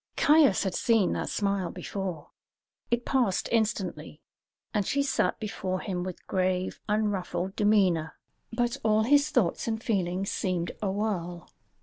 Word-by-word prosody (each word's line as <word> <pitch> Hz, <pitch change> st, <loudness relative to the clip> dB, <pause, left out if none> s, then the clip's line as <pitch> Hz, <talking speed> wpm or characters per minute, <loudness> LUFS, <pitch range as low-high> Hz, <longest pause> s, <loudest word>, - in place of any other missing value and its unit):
Caius 295 Hz, -8 st, +5 dB
had 190 Hz, -2 st, -1 dB
seen 225 Hz, -4 st, +2 dB
that -, -, -2 dB
smile 200 Hz, -3 st, 0 dB
before. 185 Hz, -6 st, -5 dB, 0.6 s
It 240 Hz, 0 st, 0 dB
passed 240 Hz, -8 st, +1 dB
instantly, 195 Hz, -9 st, -1 dB, 0.5 s
and 210 Hz, -, +1 dB
she 280 Hz, +8 st, 0 dB
sat 265 Hz, -2 st, 0 dB
before 190 Hz, -3 st, -3 dB
him 185 Hz, -3 st, -3 dB
with 185 Hz, -1 st, -7 dB
grave, 185 Hz, 0 st, -1 dB
unruffled 200 Hz, -3 st, -1 dB
demeanour; 190 Hz, -7 st, +2 dB, 0.4 s
but 240 Hz, 0 st, 0 dB
all 215 Hz, 0 st, +3 dB
his 285 Hz, +5 st, +4 dB
thoughts 240 Hz, -, +1 dB
and 220 Hz, -1 st, -1 dB
feelings 195 Hz, -4 st, -1 dB
seemed 180 Hz, -3 st, -1 dB
a 205 Hz, -, 0 dB
whirl. 185 Hz, -4 st, -3 dB
200 Hz, 135 wpm, -28 LUFS, 185-225 Hz, 0.6 s, Caius